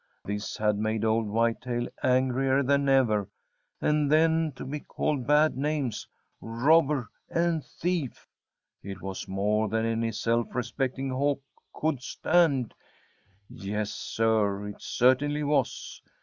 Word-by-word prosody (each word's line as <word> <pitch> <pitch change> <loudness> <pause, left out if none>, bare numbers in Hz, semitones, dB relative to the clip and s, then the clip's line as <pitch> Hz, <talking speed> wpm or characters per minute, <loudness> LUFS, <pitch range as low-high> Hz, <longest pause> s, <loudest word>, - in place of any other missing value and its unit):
This 105 +1 -4
had 105 -1 +1
made 110 +1 -1
old 110 0 +1
Whitetail 115 +2 0
angrier 130 +1 +2
than 140 +1 +2
ever, 110 -7 +3 0.5
and 150 -1 +1
then 160 0 +3
to - - -7
be 150 +3 -4
called 140 -3 -2
bad 150 0 +4
names 140 -4 -2 0.3
robber 135 +2 +2 0.2
and 170 -2 0
thief! 170 -7 -3 0.5
It 100 0 -8
was 95 -1 -5
more 105 +3 0
than 110 +2 0
any 115 0 0
self 115 +2 -1
respecting 130 +2 -2
Hawk 140 +1 0 0.3
could 155 -5 -1
stand. 140 -3 +1 0.7
Yes, 105 +2 -4
Sir, 105 -3 0
it 105 - -10
certainly 145 +4 +2
was! 145 -3 -1
125 Hz, 120 wpm, -27 LUFS, 110-145 Hz, 0.7 s, bad